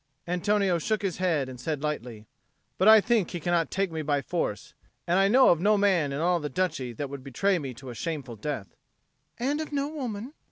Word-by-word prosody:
Antonio 185 0 +1
shook 215 +5 -1
his 190 -4 -1
head 165 -7 +1
and 130 -1 -9
said 150 +2 -3
lightly, 120 -8 -4 0.5
"But 190 - +4
I 220 -1 +9
think 220 -5 +1
he 175 - -4
cannot 170 0 +1
take 195 -2 -1
me 160 -1 -3
by 145 -2 0
force, 165 -12 -3 0.3
and 180 +2 +2
I 195 - +5
know 255 +5 +6
of 170 - +4
no 210 +2 +4
man 185 -8 +2
in 140 - -3
all 175 +2 +2
the 150 -2 -4
Duchy 135 -5 -1
that 145 +5 -4
would 135 -1 -8
betray 180 +8 +1
me 135 -5 -6
to 130 +1 -9
a - - -7
shameful 140 -3 -4
death." 110 -3 -5 0.6
"And 280 +6 -1
of 310 - -6
no 285 0 -1
woman?" 255 -4 -5
175 Hz, 215 wpm, -27 LUFS, 140-205 Hz, 0.6 s, I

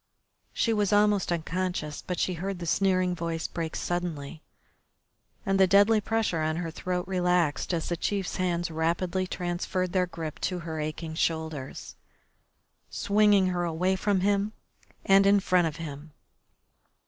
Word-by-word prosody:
She 230 - +1
was 210 -2 +1
almost 205 -3 +3
unconscious, 170 -2 -2
but 180 - -4
she 185 - 0
heard 190 +3 -4
the 175 - -6
sneering 185 +1 +2
voice 165 -2 -3
break 165 -1 -4
suddenly 165 -4 -3 1.0
and 195 0 +1
the 190 - +6
deadly 205 +3 +5
pressure 220 -7 0
on 155 0 0
her 165 -1 -3
throat 180 +2 -3
relaxed 180 -5 +1
as 165 -2 -1
the 175 - -1
chief's 195 +2 -2
hands 175 -2 -1
rapidly 170 +3 -1
transferred 180 0 -2
their 185 -1 +2
grip 160 -3 -6
to 180 -2 -2
her 160 -1 -4
aching 155 +1 -4
shoulders, 160 -4 -3 0.9
swinging 205 -2 +3
her 175 -1 -1
away 175 +3 0
from 195 0 +1
him 200 +2 +1 0.5
and 195 0 +6
in 200 0 +6
front 180 -3 +2
of 155 - -5
him. 150 -1 -8
180 Hz, 150 wpm, -27 LUFS, 165-195 Hz, 1.0 s, the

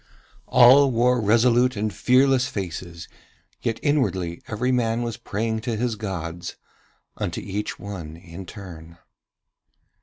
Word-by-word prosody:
All 135 +3 +7
wore 125 0 +2
resolute 120 +3 +3
and 105 0 -2
fearless 130 +5 +3
faces, 85 -3 -6 0.5
yet 115 -1 -2
inwardly 95 - 0
every 120 +4 -1
man 120 -1 +1
was 115 -2 -3
praying 110 +3 -3
to 115 0 -2
his 120 0 -1
gods, 90 -5 -5 0.6
unto - - -3
each 100 +1 -4
one 90 -6 -8
in 85 +1 -10
turn. 85 -5 -11
110 Hz, 120 wpm, -24 LUFS, 90-125 Hz, 0.6 s, All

